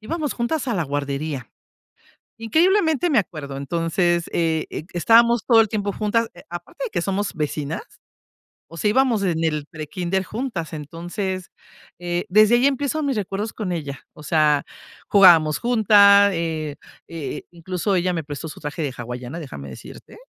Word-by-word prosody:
íbamos 300 Hz, +5 st, -3 dB
juntas 260 Hz, +4 st, -2 dB
a 235 Hz, -, 0 dB
la 175 Hz, -, 0 dB
guardería. 140 Hz, -1 st, -4 dB, 0.9 s
Increíblemente 320 Hz, -, +2 dB
me 275 Hz, -8 st, +4 dB
acuerdo. 150 Hz, -7 st, -6 dB
Entonces, 170 Hz, +4 st, 0 dB
eh, 160 Hz, -2 st, 0 dB
e -, -, -6 dB
estábamos 230 Hz, +5 st, +4 dB
todo 230 Hz, -3 st, +6 dB
el 220 Hz, -, +1 dB
tiempo 205 Hz, -1 st, -2 dB
juntas, 225 Hz, +3 st, 0 dB, 0.2 s
aparte 175 Hz, -, -6 dB
de -, -, -4 dB
que 170 Hz, -, -2 dB
somos 195 Hz, +2 st, -2 dB
vecinas, 150 Hz, -1 st, -3 dB, 0.9 s
o 165 Hz, -, -12 dB
sea, 210 Hz, -, +1 dB
íbamos 245 Hz, -1 st, +2 dB
en 165 Hz, -4 st, 0 dB
el 150 Hz, -2 st, -1 dB
prekinder 175 Hz, +4 st, -3 dB
juntas. 210 Hz, -, -5 dB
Entonces, 175 Hz, +5 st, -5 dB, 0.5 s
eh, 175 Hz, 0 st, -2 dB
desde 215 Hz, +4 st, +6 dB
ahí 245 Hz, +3 st, +3 dB
empiezo 280 Hz, +2 st, 0 dB
mis 275 Hz, -3 st, 0 dB
recuerdos 205 Hz, +2 st, -3 dB
con 205 Hz, -5 st, -4 dB
ella. 145 Hz, -5 st, -4 dB, 0.2 s
O 150 Hz, -, -12 dB
sea, 150 Hz, -2 st, +2 dB, 0.4 s
jugábamos 170 Hz, -6 st, +6 dB
junta, 205 Hz, -4 st, +6 dB
eh 160 Hz, -3 st, -3 dB, 0.3 s
eh, 165 Hz, -4 st, -6 dB
incluso 180 Hz, +3 st, -2 dB
ella 180 Hz, 0 st, +1 dB
me 165 Hz, -2 st, -3 dB
prestó 145 Hz, +2 st, -6 dB
su -, -, -10 dB
traje 150 Hz, +2 st, -5 dB
de 145 Hz, -3 st, -1 dB
hawaiana, 125 Hz, +6 st, -6 dB
déjame 70 Hz, -, -8 dB
decirte. 65 Hz, -, -12 dB
175 Hz, 155 wpm, -22 LUFS, 155-220 Hz, 0.9 s, todo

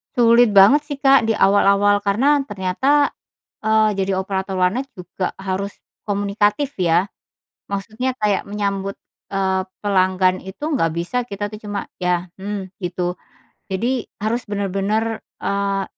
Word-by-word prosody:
Sulit 235 Hz, -2 st, +5 dB
banget 205 Hz, +9 st, +7 dB
sih 285 Hz, -2 st, -6 dB
Kak 270 Hz, -3 st, +5 dB
di 225 Hz, -, +1 dB
awal-awal 205 Hz, 0 st, +4 dB
karena 270 Hz, +9 st, +3 dB
ternyata, 260 Hz, +8 st, +1 dB, 0.6 s
eee, 220 Hz, -1 st, +3 dB
jadi 190 Hz, -1 st, 0 dB
operator 190 Hz, 0 st, -3 dB
warnet 225 Hz, +10 st, +1 dB
juga 180 Hz, 0 st, -5 dB
harus 195 Hz, +1 st, -3 dB, 0.3 s
komunikatif 205 Hz, +6 st, 0 dB
ya, 180 Hz, +1 st, +2 dB, 0.6 s
maksudnya 225 Hz, +6 st, -3 dB
kayak 210 Hz, -2 st, +1 dB
menyambut, 200 Hz, -1 st, -3 dB, 0.3 s
eee, 190 Hz, -1 st, 0 dB, 0.2 s
pelanggan 185 Hz, -2 st, +2 dB
itu 190 Hz, 0 st, -10 dB, 0.2 s
nggak 165 Hz, -10 st, +1 dB
bisa 175 Hz, +10 st, -2 dB
kita 205 Hz, -3 st, -5 dB
tuh 215 Hz, +1 st, -9 dB
cuma 205 Hz, -1 st, -4 dB, 0.2 s
"ya", 180 Hz, 0 st, +1 dB
"mmm", 195 Hz, 0 st, -5 dB, 0.2 s
gitu. 180 Hz, 0 st, -2 dB, 0.5 s
Jadi 235 Hz, +6 st, -1 dB, 0.2 s
harus 235 Hz, +3 st, 0 dB
bener-bener, 205 Hz, +3 st, -1 dB, 0.2 s
eee, 200 Hz, -1 st, -1 dB
200 Hz, 130 wpm, -20 LUFS, 190-220 Hz, 0.6 s, banget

